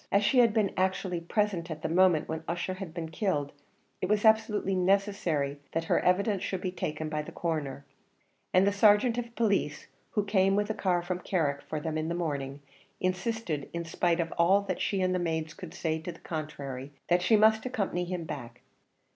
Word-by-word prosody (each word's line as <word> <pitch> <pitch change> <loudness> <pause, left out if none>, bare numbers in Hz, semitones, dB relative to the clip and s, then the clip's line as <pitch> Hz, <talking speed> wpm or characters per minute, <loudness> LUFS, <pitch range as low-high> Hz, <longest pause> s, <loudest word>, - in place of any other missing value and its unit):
As 200 +1 +4
she 230 +5 +4
had 235 -2 +6
been 210 -2 +1
actually 185 -1 0
present 180 -1 -1
at 155 -1 -6
the - - +1
moment 175 -1 +4
when 160 0 -4
Ussher 175 +2 -2
had 185 -3 -7
been 165 -1 -5
killed, 160 -7 -1 0.5
it 185 - -1
was 210 +1 +2
absolutely 220 -3 +3
necessary 185 -7 +1
that 165 - 0
her - - +2
evidence 195 +2 +2
should 190 -2 -3
be 185 - -2
taken 155 -3 -3
by 155 -1 -2
the 150 - -9
Coroner; 145 -5 -3 0.7
and 185 +1 +5
the 200 - +3
sergeant 210 +4 +4
of 235 -1 -6
police, 200 -9 0 0.3
who 210 - +1
came 195 -1 +3
with 205 +1 +1
a - - -1
car 180 -4 0
from 180 0 -3
Carrick 155 -7 0
for 155 - -4
them 155 +1 -2
in 155 +1 -2
the 170 - -1
morning, 145 -5 -3 0.4
insisted, 185 -4 -2
in 170 0 -3
spite 170 +1 +1
of 165 -1 -1
all 190 +4 +5
that 200 - -3
she 195 -2 0
and 185 0 +2
the 180 - +1
maids 160 -2 -2
could 180 -1 -9
say 160 -1 -1
to 170 +3 -6
the 165 - -14
contrary, 145 -4 -5 0.2
that 175 0 +3
she 200 +5 +4
must 220 +2 +4
accompany 200 -8 -1
him 175 -1 -3
back. 120 -6 -7
180 Hz, 205 wpm, -29 LUFS, 160-200 Hz, 0.7 s, had